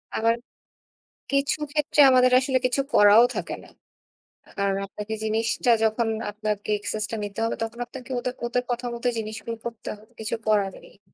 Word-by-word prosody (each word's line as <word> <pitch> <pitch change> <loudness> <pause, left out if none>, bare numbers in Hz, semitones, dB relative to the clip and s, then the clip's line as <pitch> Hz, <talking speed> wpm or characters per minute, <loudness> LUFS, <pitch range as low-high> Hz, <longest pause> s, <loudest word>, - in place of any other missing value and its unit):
আবার 230 +1 +2 1.0
কিছু 275 +2 +1
ক্ষেত্রে 300 0 -1
আমাদের 255 0 +5
আসলে 260 -1 +1
কিছু 255 +2 +2
করাও 205 +3 +7
থাকে - - -3
না। - - -15 0.9
কারণ 200 -1 +1
আপনাকে 210 +2 -6
জিনিসটা 225 +2 +1
যখন 225 +1 +1 0.2
আপনাকে 210 0 -3
এক্সেসটা 215 +2 -3
নিতে 205 +1 -8
হবে, 230 - -1
তখন 225 +1 -4
আপনাকে 255 0 -11
ওদে 250 +1 -2 0.2
ওদের 245 +1 -1
কথা 245 0 -2
মতো 235 +1 -5
জিনিসগুলো 220 +1 -5
করতে 230 -2 -6
হবে, 215 - -21
কিছু 220 - -2
করার 200 -3 +2
নেই। 200 - -19
225 Hz, 155 wpm, -25 LUFS, 215-245 Hz, 1.0 s, করাও